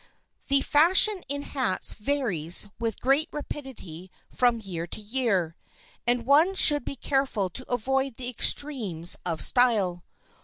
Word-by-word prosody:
The 275 0 +1
fashion 365 +7 +4
in 285 0 -3
hats 260 -11 -1
varies 210 - 0
with 225 -3 -4
great 275 +5 0
rapidity 255 - -9 0.2
from 245 -2 0
year 175 -5 -7
to - - -8
year, 210 -7 -2 0.5
and 240 -1 0
one 310 +8 +3
should 295 -6 +6
be 275 - -7
careful 265 -8 -2
to 255 +8 -6
avoid 265 +2 -2
the 250 0 -7
extremes 220 - +2
of 165 -2 -1
style. 205 -8 +2
245 Hz, 130 wpm, -25 LUFS, 195-280 Hz, 0.5 s, should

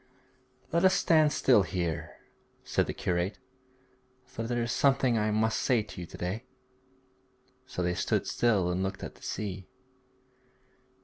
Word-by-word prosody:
'Let 170 +2 +2
us 190 0 +5
stand 155 -5 +4
still 125 -8 +4
here,' 90 -4 -3 0.5
said - - 0
the - - -1
curate, 90 +3 -1 0.9
'for - - -7
there 120 0 0
is 115 - -2
something 130 -3 +3
I 110 -1 +1
must 110 +1 +1
say 120 -4 +2
to 105 - -9
you 85 - -7
to - - -11
day.' 95 +8 -4 1.2
So 90 - -3
they 90 0 +1
stood - - 0
still 100 -7 +2
and 90 +1 -1
looked 95 0 -3
at - - -6
the - - -22
sea. 95 -3 -5
110 Hz, 150 wpm, -29 LUFS, 90-125 Hz, 1.2 s, us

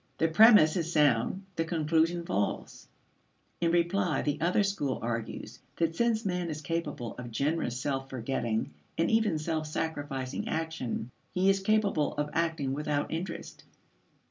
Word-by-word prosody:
The 165 - +2
premise 190 -3 +7
is 170 -1 -1
sound; 150 - +2
the 165 - +2
conclusion 165 +1 +1
false. 100 - -2 0.7
In 170 - +2
reply 175 -1 +1
the 145 0 -1
other 180 +5 +3
school 170 -10 -1
argues 115 -1 -4 0.2
that 165 -1 0
since 230 0 +1
man 180 -2 -1
is 155 -1 -4
capable 155 -6 -3
of 120 -1 -6
generous 140 0 -1
self 135 0 -2
forgetting 120 - -2 0.2
and 165 +5 +2
even 220 -7 +3
self 155 0 -2
sacrificing 145 -4 -3
action, 160 -7 -3 0.2
he 190 +2 +4
is 195 - +1
capable 200 -8 +1
of 150 0 -2
acting 160 -5 0
without 150 0 -1
interest. 170 +1 -5
160 Hz, 145 wpm, -29 LUFS, 140-175 Hz, 0.7 s, premise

